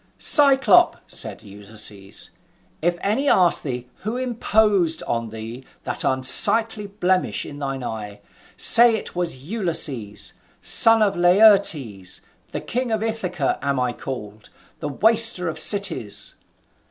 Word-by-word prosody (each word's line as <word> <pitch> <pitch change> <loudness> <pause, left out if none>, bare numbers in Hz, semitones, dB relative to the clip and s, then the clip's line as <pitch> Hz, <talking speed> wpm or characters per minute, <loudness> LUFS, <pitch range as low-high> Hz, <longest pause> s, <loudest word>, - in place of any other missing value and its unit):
"Cyclop," 290 +4 +3
said - - -6
Ulysses, 105 -1 -7 0.5
"if 175 +2 -1
any 255 +8 -1
ask 175 -2 +3
thee 125 -3 -6
who 220 +5 -6
imposed 215 -9 0
on 115 -1 -4
thee 115 +3 -10 0.2
that - - -3
unsightly 210 - +3
blemish 185 -2 -2
in 145 -1 -11
thine 135 -2 -5
eye, 105 -3 -8 0.4
say 235 -1 +7
it 220 - -7
was 170 -7 -4
Ulysses, 155 - -2 0.3
son 225 -1 +5
of 200 - -1
Laertes: 175 - +2 0.3
the - - -6
king 250 +1 -4
of 220 -1 -2
Ithaca 180 -10 -3
am 140 -2 -2
I 125 -1 -2
called, 110 -5 -10 0.3
the 150 - -5
waster 220 - +2
of 160 - -5
cities." 130 - +1
175 Hz, 125 wpm, -20 LUFS, -, 0.5 s, say